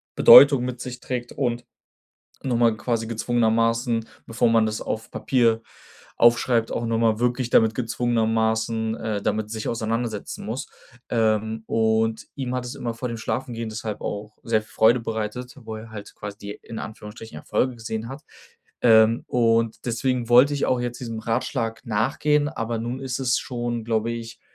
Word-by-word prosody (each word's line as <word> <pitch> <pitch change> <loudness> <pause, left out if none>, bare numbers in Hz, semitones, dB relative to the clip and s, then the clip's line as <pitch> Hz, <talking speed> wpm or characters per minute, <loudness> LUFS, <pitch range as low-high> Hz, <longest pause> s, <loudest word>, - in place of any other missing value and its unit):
Bedeutung 140 -3 +9
mit 125 -1 -5
sich 125 -1 -6
trägt 125 -1 -4
und 120 -3 -2 0.8
noch 125 -3 0
mal 115 -2 +3
quasi 115 0 -2
gezwungenermaßen 115 0 +1 0.2
bevor 115 +1 +1
man 115 -1 +4
das 110 0 -2
auf 110 +1 -4
Papier 115 -4 +1 0.6
aufschreibt, 120 -1 +3
auch 115 - -2
noch 115 0 0
mal 115 -1 +2
wirklich 125 0 0
damit 110 -1 +4
gezwungenermaßen, 115 -1 0
äh, 105 -2 -3
damit 110 0 -1
sich 110 -1 -4
auseinandersetzen 115 -2 -3
muss. 115 +5 -4 0.4
Ähm, 110 -1 0
und 110 0 +1
ihm 130 -2 -3
hat 125 -1 -2
es 120 - -6
immer 115 -2 -4
vor 125 +2 -4
dem 115 - -4
Schlafengehen 115 -1 -3
deshalb 110 -1 -5
auch 105 +1 -5
sehr 110 -2 +1
Freude 115 +3 +3
bereitet, 115 +3 -4
wo 110 0 -6
er 110 +1 -10
halt 105 -2 -9
quasi 105 0 -8
die 100 0 -7
in 115 - -8
Anführungsstrichen 110 +1 -9
Erfolge 130 -1 -1
gesehen 110 0 -5
hat. 135 +3 -8 0.6
Ähm, 115 -1 +5
und 115 -1 +1
deswegen 120 0 -1
wollte 135 +4 +6
ich 140 - 0
auch 125 -1 +1
jetzt 120 0 -4
diesem 115 -2 -5
Ratschlag 115 0 -2
nachgehen, 145 +7 +1
aber 115 -6 -3
nun 120 +3 -4
ist 130 -1 -3
es 125 0 +2
schon, 120 -1 -4
glaube 115 0 0
ich, 115 0 -7
115 Hz, 165 wpm, -24 LUFS, 110-120 Hz, 0.8 s, Bedeutung